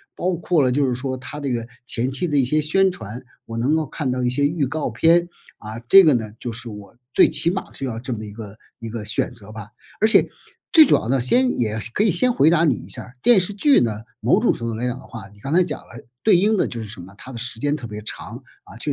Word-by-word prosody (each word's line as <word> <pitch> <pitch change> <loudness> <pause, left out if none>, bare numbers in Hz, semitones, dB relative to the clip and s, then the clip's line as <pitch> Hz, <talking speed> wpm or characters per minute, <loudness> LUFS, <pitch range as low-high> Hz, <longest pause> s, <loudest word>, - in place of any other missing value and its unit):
包 185 - -1
括 170 -2 +1
了 125 - +2
就 140 +1 +1
是 125 - -1
说 130 +1 -4
它 145 +3 -8
这 140 -2 -2
个 115 -1 -3 0.2
前 125 0 -1
期 135 +6 0
的 150 -4 0
一 135 - +3
些 155 +4 +1
宣 190 +6 +2
传， 125 - -8 0.2
我 115 - -8
能 130 +7 +1
够 160 -1 0
看 140 -1 -4
到 125 0 -2
一 125 - +1
些 140 +3 +1
预 155 -2 -1
告 150 +3 -3
片， 170 +1 +3 0.3
啊， 110 +1 -8
这 195 0 +9
个 150 - +5
呢， 110 -4 -2
就 120 -2 -5
是 120 0 -5
我 105 -2 -11 0.2
最 - - +6
起 170 - +3
码 190 +2 -4
是 135 - -4
要 115 -4 -3
这 125 +1 -4
么 110 -1 -6
一 105 - -8
个 105 -1 -10 0.2
一 115 - -7
个 110 -1 -6
选 110 +4 -1
择 110 -3 -9
吧。 110 0 -10 0.3
而 220 - +4
且 220 - +4 0.4
最 320 -3 +8
主 - - +4
要 110 - -2
的 135 - +2
先 245 - +2
也 110 -2 -1 0.2
可 210 - +1
以 - - +3
先 250 +8 +3
回 155 -8 +4
答 170 -1 +3
你 145 -7 +3
一 - - -11
下 - - -1
儿， 125 +1 -16
电 235 -6 +5
视 180 - -1
剧 275 +8 +4
呢， 115 - +1 0.3
某 - - +3
种 - - +2
程 115 - -5
度 115 - -4
来 120 +3 -2
讲 125 - -3
的 - - -13
话， 110 -4 -10
你 105 - -20
刚 135 +5 -4
才 180 +1 +4
讲 150 - -5
了 115 - -14 0.2
对 210 -5 +5
应 210 +4 +2
的 - - +1
就 120 - -6
是 110 - -6
什 105 -2 -10
么， 95 +3 -13
它 130 - -10
的 - - -7
时 115 -1 -2
间 145 +2 0
特 130 -6 -7
别 105 0 -8
长。 - - -7 0.2
啊， 110 - -14
确 145 - -2
130 Hz, 310 characters per minute, -21 LUFS, 115-165 Hz, 0.4 s, 这